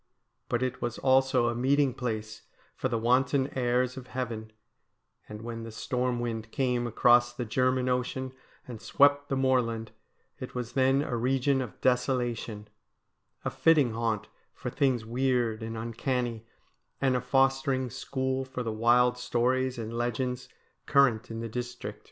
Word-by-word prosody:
But 120 +1 0
it 125 -1 -3
was 120 -1 -2
also 130 -2 +3
a 120 - +1
meeting 135 +2 +2
place 110 -4 -4 0.3
for 130 - -2
the 120 - 0
wanton 130 +4 +2
airs 125 0 +1
of 130 -1 -8
heaven; 115 -4 -5 0.8
and 105 +1 -8
when 115 0 -5
the 115 - -7
storm 125 +2 -1
wind 115 -2 -3
came 125 -3 0
across 120 +1 +4
the 120 -1 -3
German 130 +3 +1
Ocean 130 +1 -1 0.3
and 120 -4 -8
swept 145 0 +3
the 135 - 0
moorland, 125 -4 +1 0.5
it - - -8
was 125 -2 -4
then 135 +1 +3
a 125 - -3
region 130 +3 +1
of 125 -5 -7
desolation, 120 -4 0 0.8
a - - 0
fitting 150 -8 +3
haunt 115 -2 -1 0.3
for - - -5
things 130 -5 +1
weird 120 -2 0
and 115 0 -5
uncanny, 115 0 -2 0.5
and 130 -2 +2
a 125 - 0
fostering 135 0 +1
school 130 +1 -2
for 130 -1 -5
the 110 -2 -3
wild 120 +2 +3
stories 125 +1 0
and 115 -1 -5
legends 125 +1 -2 0.4
current 125 -5 +3
in 115 0 -5
the 115 - -3
district. 125 +2 -6
125 Hz, 150 wpm, -29 LUFS, 115-130 Hz, 0.8 s, across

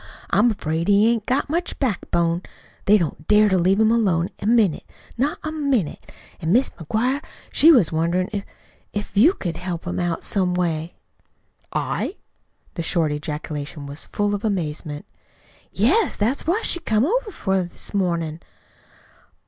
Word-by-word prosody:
I'm 235 +4 +4
afraid 165 -6 -2
he 205 +1 +5
hain't 225 -3 -2
got 260 +3 +1
much 340 +4 -2
backbone. 175 - 0 0.4
They 210 +1 +6
don't 155 -4 -3
dare 210 0 +5
to 190 - +3
leave 190 +4 +3
him 220 0 +4
alone 190 -7 +2
a 200 - -3
minute 220 -8 +3 0.3
not 275 +5 0
a 310 - -3
minute. 280 - -1 0.3
An' 160 - -1
Mis' 250 +6 +3
McGuire, 245 - -1 0.3
she 325 - +7
was 235 - +5
wonderin' 170 +3 0
if 200 -1 -2 0.5
if 205 -1 -5
you 270 - +6
couldn't 170 -2 -5
help 175 -2 -4
'em 175 - -2
out 175 -2 -2
some 185 -3 +1
way." 165 -2 -1 0.8
"I?" 385 - -2 0.6
The 170 - -4
short 165 -2 +1
ejaculation 150 0 -5
was 140 +2 -5
full 205 0 -1
of 205 +2 -3
amazement. 155 -7 -3 0.7
"Yes. 325 - +2
That's 240 +9 0
what 405 +7 +1
she 345 - +3
come 225 -7 +1
over 460 +6 0
for 190 - -1
this 175 +3 -4
mornin'." 170 -5 -1
195 Hz, 155 wpm, -22 LUFS, 165-235 Hz, 0.8 s, she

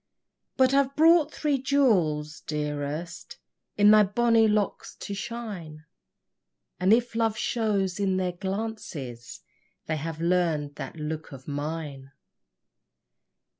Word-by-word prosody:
But 260 0 +4
I've 275 0 +2
brought 320 -1 +4
thee 290 -3 +2
jewels, 180 - +1
dearest, 150 +3 -4 0.4
In 205 0 +7
thy 215 0 +8
bonny 225 +2 +3
locks 210 -1 -1
to 200 - -6
shine, 195 -9 -6 0.9
And 185 +2 +3
if 235 +1 +3
love 225 -1 0
shows 205 -5 0
in 190 -2 +1
their 185 -1 0
glances, 175 - -6 0.4
They 155 - -2
have 160 +1 -5
learn'd 165 -4 +1
that - - -6
look 155 0 -5
of 130 -2 -11
mine! 145 -2 -5
185 Hz, 115 wpm, -26 LUFS, 155-225 Hz, 0.9 s, thy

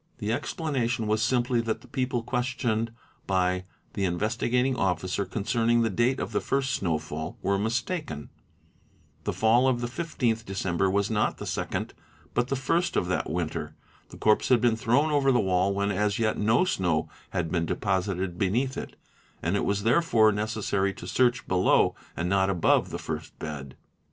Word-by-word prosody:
The 110 -1 -1
explanation 125 -5 -1
was 110 +1 +1
simply 120 0 +2
that 115 -1 -2
the - - -16
people 125 -3 -1
questioned 120 -2 -1 0.4
by 90 -1 +1 0.3
the 100 - -4
Investi 105 +6 0
gating 125 +2 +2
Officer 95 -2 0
concerning 115 +4 +1
the 115 - 0
date 120 +6 +1
of - - -3
the - - 0
first 135 -1 0
snowfall 80 -5 -2
were 100 0 +1
mistaken; 115 - -2 0.9
the - - 0
fall 115 +4 +3
of 125 -2 +2
the 120 - -2
15th 120 -4 -1
December 95 -2 0
was 100 +2 +1
not 110 -1 +1
the - - -6
second - - -3 0.4
but 120 0 +1
the 135 - -1
first 165 +7 0
of - - +2
that 90 - -1
winter, 80 0 -3 0.3
the - - -11
corpse 110 0 +3
had 125 - +5
been 120 -1 +3
thrown 125 +7 +2
over 140 -2 +3
the 125 - +3
wall 95 +1 +2
when 100 +1 0
as 105 +1 0
yet 110 -1 +1
no 110 - +3
snow 90 - 0 0.2
had 90 -4 -2
been 85 -2 0
deposited 95 -2 -1
beneath 120 +8 0
it, - - -6 0.5
and 85 +4 +1
it - - 0
was 100 0 0
therefore 115 -3 +4
necessary 105 -2 -1
to - - -9
search 125 -1 +1
below 90 0 +3 0.2
and 85 - -1
not 95 +1 +2
above 90 -4 +2
the - - -4
first - - -6
bed. 70 -3 -7
110 Hz, 175 wpm, -27 LUFS, 95-120 Hz, 0.9 s, had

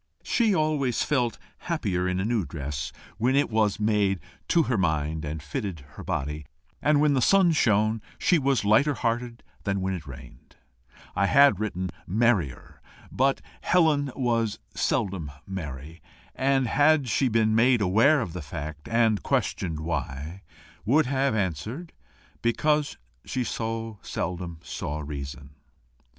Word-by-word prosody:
She 225 -5 +2
always 150 -6 +1
felt 120 -7 0 0.2
happier 100 - -1
in 90 0 -1
a 95 - -1
new 115 -2 +1
dress, 75 -2 -5 0.3
when 125 +4 +2
it 140 -3 +2
was 110 -1 +1
made 105 -3 +2 0.3
to 170 - +4
her 130 - 0
mind 80 -4 0
and 75 0 -5
fitted 80 +3 -4
her - - -10
body; 75 +1 -3 0.3
and 150 0 +3
when 150 -1 +4
the 130 - +2
sun 190 +5 +5
shone 110 -6 +2 0.2
she 175 - +3
was 135 -5 +1
lighter 135 +8 +4
hearted 120 0 -2 0.2
than 100 -1 0
when 95 0 -1
it 80 -5 -6
rained: 65 -2 -12 0.6
I 100 +1 +2
had 140 -6 +6
written 95 -4 -3 0.2
MERRIER, 105 - 0 0.3
but 135 +1 +1 0.2
Helen 155 -6 +3
was 115 -4 0 0.2
seldom 95 - -1 0.2
merry, 80 -4 -7 0.3
and 135 0 +2
had 145 +3 +3
she 120 +4 +2
been 110 -2 +2
made 120 +2 +4
aware 115 +10 +4
of 90 -9 -4
the 90 - -5
fact, 75 +1 -7
and 115 -4 +3
questioned 80 -4 -1
why, 80 +2 -4 0.4
would 140 +8 +3
have 135 -1 +1
answered 105 - -3 0.5
Because 150 +5 +1 0.3
she 130 - -2
so 115 -2 -4
seldom 85 -2 -4
saw 75 -1 -4
reason. 70 -1 -7
110 Hz, 140 wpm, -26 LUFS, 85-135 Hz, 0.6 s, had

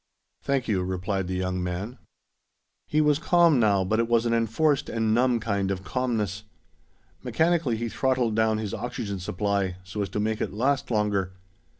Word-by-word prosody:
"Thank 135 -2 -1
you," 100 -4 +1
replied 95 +1 -2
the 95 - -3
young 90 0 -2
man. 95 +7 -4 0.9
He 155 - +2
was 150 -1 +3
calm 170 -5 +4
now, 100 -4 +3
but 110 +4 0
it 115 - +1
was 115 0 +2
an 115 - +1
enforced 135 +6 +1
and 110 -1 0
numb 120 0 +3
kind 100 -3 -1
of 95 -1 -3
calmness. 110 -5 -2 0.8
Mechanically 160 -8 +1
he 120 +1 -2
throttled 125 -1 0
down 110 -1 +2
his 105 -2 -4
oxygen 110 -3 -4
supply, 95 0 -1
so 95 +3 -5
as 100 - -2
to - - -3
make 110 +1 -1
it - - -2
last 130 +5 0
longer. 105 -4 0
110 Hz, 175 wpm, -26 LUFS, 100-125 Hz, 0.9 s, calm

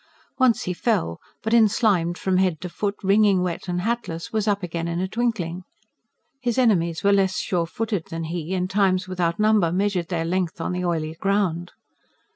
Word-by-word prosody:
Once 245 -2 +3
he 180 - -2
fell, 170 - -1 0.2
but, 220 - -1
enslimed 205 -6 +3
from 190 -1 0
head 185 -4 +1
to 180 - -5
foot, 200 +3 -3
wringing 195 -1 +4
wet 180 0 -3
and 180 0 -1
hatless, 215 -6 -3
was 215 -1 0
up 200 -2 +1
again 170 -1 -3
in 170 0 -2
a 185 - -1
twinkling. 190 -6 -2 0.8
His 245 -3 -1
enemies 170 -10 +2
were 200 0 +4
less 190 -1 +2
sure 170 -3 -1
footed 215 -2 -3
than 165 0 -4
he, 170 +2 -3
and 180 0 0
times 190 -1 +1
without 175 -2 -1
number 210 -5 +3
measured 185 -2 0
their 165 -3 -2
length 180 -1 -1
on - - -2
the 180 0 -2
oily 160 -3 -1
ground. 180 -1 -1
185 Hz, 185 wpm, -23 LUFS, 170-205 Hz, 0.8 s, wringing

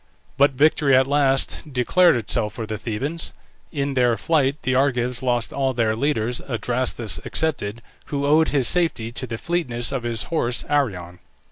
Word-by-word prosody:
But 140 0 +4
victory 145 0 +3
at 130 +1 +5
last 135 -1 +1
declared 165 +7 +3
itself 105 -2 0
for 115 - -4
the 110 -1 -5
Thebans. 140 +11 -3 0.4
In 140 -3 -2
their 125 -3 +2
flight 145 -3 +1
the 130 - 0
Argives 125 -2 0
lost 120 -2 -1
all 135 -2 -1
their 110 -2 +1
leaders, 120 -2 -1
Adrastus 120 -1 -1
excepted, 115 -8 -1 0.2
who 140 -1 -2
owed 155 +2 +4
his 135 -5 +1
safety 160 -10 +1
to 130 +1 -4
the 115 -1 -5
fleetness 125 -7 -2
of 135 - -2
his 115 -2 -2
horse 125 -6 0
Arion. 90 -12 -1
130 Hz, 160 wpm, -22 LUFS, 115-145 Hz, 0.4 s, at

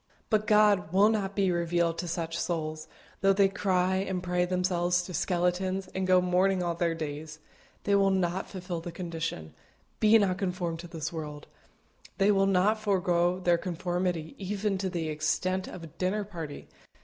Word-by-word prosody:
But 215 -1 +2
God 210 -5 +4
will 200 +3 +5
not 200 -3 -1
be 195 -2 +2
revealed 170 -1 0
to 175 - -3
such 165 -1 -3
souls, 155 -2 -3 0.3
though 195 +1 +4
they 195 0 +4
cry 190 -1 +1
and 190 -1 -2
pray 180 0 +1
themselves 180 -1 +1
to 180 - -8
skeletons, 185 +2 0
and 190 0 -1
go 185 0 +6
mourning 180 +1 +2
all 170 -1 0
their 170 0 0
days. 155 0 -6 0.5
They 200 - +1
will 200 -1 +4
not 185 -1 0
fulfil 180 -3 -5
the 175 - -6
condition 165 - -5 0.5
"Be 215 +1 +6
not 195 -3 +1
conformed 180 -3 -2
to 175 - -8
this 165 -1 -5
world;" 150 -2 -6 0.7
they 200 +1 +4
will 195 -1 +3
not 195 +3 +3
forego 180 -3 +1
their 175 -2 +2
conformity 175 -2 -2
even 200 0 -2
to 190 0 -1
the 170 -3 -3
extent 185 +5 -1
of 175 - -9
a - - -7
dinner 200 +3 0
party. 165 -7 -8
180 Hz, 175 wpm, -29 LUFS, 170-195 Hz, 0.7 s, go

